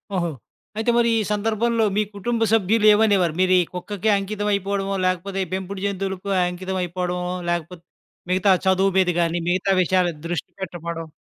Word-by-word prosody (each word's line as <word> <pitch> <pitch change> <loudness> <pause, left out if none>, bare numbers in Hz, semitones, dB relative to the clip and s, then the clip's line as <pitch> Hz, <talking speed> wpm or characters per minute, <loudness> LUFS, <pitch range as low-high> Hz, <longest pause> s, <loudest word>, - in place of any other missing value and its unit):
ఓహో! 175 -2 0 0.5
అయితే 225 +2 +1
మరి, 235 0 +3
ఈ - - +1
సందర్భంలో 225 +2 +1
మీ - - +4
కుటుంబ 230 +3 -2
సభ్యులేమనేవారు? 210 -4 +4
మీరు 185 0 +3
ఈ - - +1
కుక్కకే 200 +3 -3
అంకితమైపోవడమో, 200 -1 -1
లేకపోతే 185 +2 -1
ఈ - - -14
పెంపుడు 190 +1 -4
జంతువులకు 195 0 -3 0.2
అంకితమయిపోవడమో, 180 -1 -3 0.2
లాకపోతే 175 0 -3 0.5
మిగతా 190 +2 +3
చదువు 190 +1 +3
మీద 185 -1 +3
గాని, 170 0 0
మిగతా 185 +2 +1
విషయాలు 180 0 +2 0.2
దృష్టి 170 -3 -3
పెట్టకపోవడం 170 -2 -5
190 Hz, 140 wpm, -22 LUFS, 180-205 Hz, 0.5 s, మీ